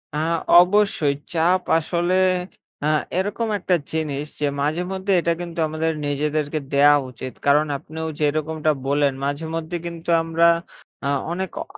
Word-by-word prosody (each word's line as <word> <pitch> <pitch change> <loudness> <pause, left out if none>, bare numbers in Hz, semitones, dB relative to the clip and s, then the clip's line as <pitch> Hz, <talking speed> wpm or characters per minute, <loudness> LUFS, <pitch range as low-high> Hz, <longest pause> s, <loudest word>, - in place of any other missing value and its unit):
আ - - -1 0.4
অবশ্যই। 180 -7 +2 0.2
চাপ 175 +3 +3 0.2
আসলে 175 +2 -1 0.7
আ - - +1 0.3
এরকম 205 +4 -1
একটা 180 - +1 0.2
জিনিস, 150 -3 -2
যে, 150 - 0 0.2
মাঝেমধ্যে 180 +6 -1
এটা 170 - +1
কিন্তু 170 -1 -6
আমাদের 155 +1 -1
নিজেদেরকে 150 +1 -1
দেয়া 145 +1 +6
উচিত। 125 +1 -8
কারণ 145 +2 +4
আপনিও 160 +2 -6
যেরকমটা 155 +1 0 0.2
বললেন, 145 0 +2
মাঝেমধ্যে 160 +4 -3
কিন্তু 170 0 -7
আমরা 165 +1 +3 0.6
আ - - +1 0.2
অনেক 190 +1 -3
অ - - -2
160 Hz, 130 wpm, -22 LUFS, 150-175 Hz, 0.7 s, দেয়া